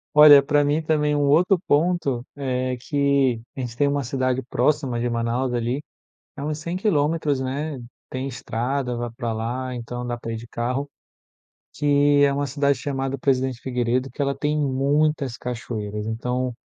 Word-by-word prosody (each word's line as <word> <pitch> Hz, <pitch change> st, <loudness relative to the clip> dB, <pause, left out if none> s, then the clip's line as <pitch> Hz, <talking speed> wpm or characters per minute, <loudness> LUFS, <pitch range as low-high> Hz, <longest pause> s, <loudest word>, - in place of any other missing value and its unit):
Olha, 150 Hz, -2 st, +9 dB
para 145 Hz, +1 st, +3 dB
mim 145 Hz, +2 st, +1 dB
também 150 Hz, -2 st, +1 dB
um 145 Hz, -, +1 dB
outro 170 Hz, +7 st, +4 dB
ponto 145 Hz, -5 st, +1 dB
é 130 Hz, -2 st, -2 dB
que, 140 Hz, -2 st, +1 dB, 0.2 s
a -, -, -4 dB
gente 120 Hz, -2 st, -5 dB
tem 145 Hz, +3 st, +2 dB
uma 140 Hz, 0 st, 0 dB
cidade 130 Hz, +1 st, -1 dB
próxima 130 Hz, 0 st, 0 dB
de 120 Hz, +1 st, 0 dB
Manaus 120 Hz, +2 st, -1 dB
ali, 120 Hz, +4 st, -1 dB, 0.6 s
é 140 Hz, -, -5 dB
uns 150 Hz, 0 st, -2 dB
100 170 Hz, +3 st, -4 dB
quilômetros, 155 Hz, -6 st, +1 dB
né, 140 Hz, +3 st, -3 dB, 0.3 s
tem 130 Hz, +1 st, -3 dB
estrada, 125 Hz, +1 st, -2 dB
vai 120 Hz, 0 st, -3 dB
para 120 Hz, -3 st, -2 dB
lá, 125 Hz, +3 st, -3 dB
então 120 Hz, +1 st, -5 dB
dá 120 Hz, 0 st, -3 dB
para 115 Hz, -, -6 dB
ir -, -, -3 dB
de 115 Hz, +1 st, -8 dB
carro, 125 Hz, +4 st, -2 dB, 0.9 s
que 145 Hz, -1 st, +4 dB
é 140 Hz, -, +2 dB
uma 140 Hz, 0 st, -1 dB
cidade 140 Hz, +1 st, +1 dB
chamada 135 Hz, -1 st, -2 dB
Presidente 130 Hz, -2 st, 0 dB
Figueiredo, 125 Hz, +1 st, -1 dB
que 125 Hz, -, -21 dB
ela 140 Hz, -1 st, +1 dB
tem 150 Hz, +2 st, -1 dB
muitas 140 Hz, -1 st, +1 dB
cachoeiras, 110 Hz, -4 st, -4 dB
então, 125 Hz, +2 st, -2 dB
135 Hz, 170 wpm, -23 LUFS, 125-145 Hz, 0.9 s, Olha